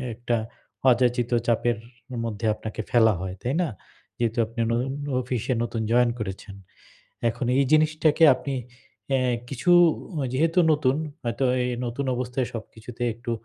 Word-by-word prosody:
একটা 120 Hz, 0 st, -1 dB, 0.5 s
অযাচিত 120 Hz, 0 st, +2 dB, 0.2 s
চাপের 120 Hz, 0 st, +2 dB, 0.5 s
মধ্যে 110 Hz, -1 st, -4 dB
আপনাকে 110 Hz, 0 st, -6 dB
ফেলা 110 Hz, -2 st, +5 dB
হয়। 95 Hz, 0 st, -4 dB
তাই 125 Hz, -, -1 dB
না? 170 Hz, -, 0 dB, 0.5 s
যেহেতু 115 Hz, -1 st, -1 dB
আপনি 115 Hz, +2 st, -10 dB
নতুন 125 Hz, +3 st, 0 dB, 0.3 s
অফিসে 125 Hz, 0 st, -2 dB
নতুন 115 Hz, -1 st, -3 dB
জয়েন 120 Hz, 0 st, +4 dB
করেছেন। 100 Hz, -1 st, -6 dB, 0.7 s
এখন 120 Hz, +2 st, -3 dB
এই 140 Hz, -, +4 dB
জিনিসটাকে 155 Hz, 0 st, +4 dB
আপনি 135 Hz, +2 st, -4 dB, 0.6 s
অ্যা 135 Hz, -1 st, +2 dB, 0.3 s
কিছু 140 Hz, +6 st, -1 dB, 0.6 s
যেহেতু 165 Hz, +6 st, +1 dB
নতুন 140 Hz, -3 st, +2 dB, 0.3 s
হয়তো 120 Hz, +2 st, -1 dB, 0.2 s
এই 125 Hz, -, -1 dB, 0.2 s
নতুন 120 Hz, +4 st, -3 dB
অবস্থায় 125 Hz, +1 st, -2 dB
সবকিছুতে 115 Hz, +1 st, -8 dB
একটু 120 Hz, +1 st, -7 dB
120 Hz, 135 wpm, -25 LUFS, 115-130 Hz, 0.7 s, ফেলা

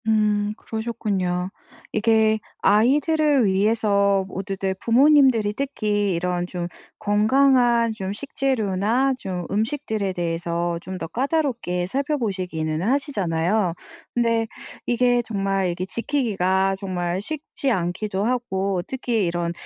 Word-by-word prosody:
음 210 Hz, -1 st, +2 dB
그러셨군요. 200 Hz, -5 st, -2 dB, 0.4 s
이게 220 Hz, 0 st, +3 dB, 0.2 s
아이들을 280 Hz, +5 st, +3 dB
위해서 200 Hz, -1 st, +2 dB
모두들 195 Hz, 0 st, -3 dB
부모님들이 255 Hz, -4 st, +4 dB
특히 210 Hz, -7 st, -1 dB
이런 180 Hz, +1 st, -1 dB
좀 175 Hz, -1 st, -4 dB, 0.3 s
건강한 235 Hz, +2 st, +3 dB
좀 195 Hz, -3 st, -4 dB
식재료나 240 Hz, 0 st, 0 dB
좀 180 Hz, -4 st, -4 dB
음식들에 220 Hz, -2 st, -1 dB
대해서 170 Hz, 0 st, -2 dB
좀 185 Hz, -, -9 dB
더 165 Hz, -, -3 dB
까다롭게 245 Hz, -, -1 dB
살펴 280 Hz, +7 st, -1 dB
보시기는 180 Hz, -, -2 dB
하시잖아요. 200 Hz, -, 0 dB, 0.4 s
근데 230 Hz, -1 st, +1 dB, 0.4 s
이게 245 Hz, 0 st, +3 dB
정말 195 Hz, -4 st, -1 dB
이게 175 Hz, +1 st, -4 dB
지키기가 195 Hz, -5 st, 0 dB
정말 180 Hz, -2 st, -2 dB
쉽지 285 Hz, +2 st, -3 dB
않기도 190 Hz, +1 st, -1 dB
하고 195 Hz, -6 st, -1 dB
특히 240 Hz, -5 st, -1 dB
이런 170 Hz, 0 st, -1 dB
210 Hz, 265 characters per minute, -23 LUFS, 185-240 Hz, 0.4 s, 부모님들이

